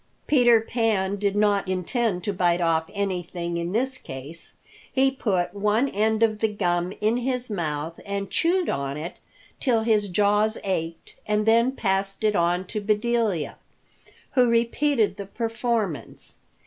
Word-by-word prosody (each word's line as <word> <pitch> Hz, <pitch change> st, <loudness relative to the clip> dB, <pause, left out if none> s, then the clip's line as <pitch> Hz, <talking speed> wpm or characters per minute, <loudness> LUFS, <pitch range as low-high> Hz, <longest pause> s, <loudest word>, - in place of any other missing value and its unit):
Peter 240 Hz, -5 st, +5 dB
Pan 220 Hz, -4 st, 0 dB
did 200 Hz, 0 st, 0 dB
not 205 Hz, -2 st, +2 dB
intend 185 Hz, +1 st, -1 dB
to 205 Hz, -, -1 dB
bite 175 Hz, -2 st, +2 dB
off 165 Hz, 0 st, +1 dB
anything 180 Hz, -4 st, -3 dB
in 170 Hz, +1 st, -3 dB
this 255 Hz, +5 st, -1 dB
case. 135 Hz, +5 st, -9 dB, 0.4 s
He 270 Hz, 0 st, +3 dB
put 190 Hz, -9 st, -1 dB
one 210 Hz, +5 st, +1 dB
end 220 Hz, +1 st, +1 dB
of 215 Hz, -2 st, +2 dB
the 220 Hz, -, +2 dB
gum 180 Hz, -4 st, -1 dB
in 220 Hz, +3 st, +2 dB
his 250 Hz, -1 st, -2 dB
mouth 160 Hz, -3 st, -3 dB
and 200 Hz, 0 st, -3 dB
chewed 350 Hz, +1 st, +2 dB
on 140 Hz, 0 st, -2 dB
it 165 Hz, +4 st, -6 dB, 0.4 s
till 240 Hz, -5 st, +2 dB
his 215 Hz, -3 st, +2 dB
jaws 210 Hz, +3 st, +2 dB
ached, 165 Hz, -4 st, -3 dB
and 210 Hz, 0 st, +1 dB
then 230 Hz, +3 st, +4 dB
passed 195 Hz, -3 st, -1 dB
it 210 Hz, -1 st, +2 dB
on 175 Hz, +1 st, +1 dB
to 210 Hz, +3 st, -4 dB
Bedelia, 215 Hz, -4 st, 0 dB, 0.7 s
who 250 Hz, -3 st, +4 dB
repeated 235 Hz, +1 st, +2 dB
the 200 Hz, -, -6 dB
performance. 225 Hz, -, -3 dB
205 Hz, 150 wpm, -25 LUFS, 180-230 Hz, 0.7 s, Peter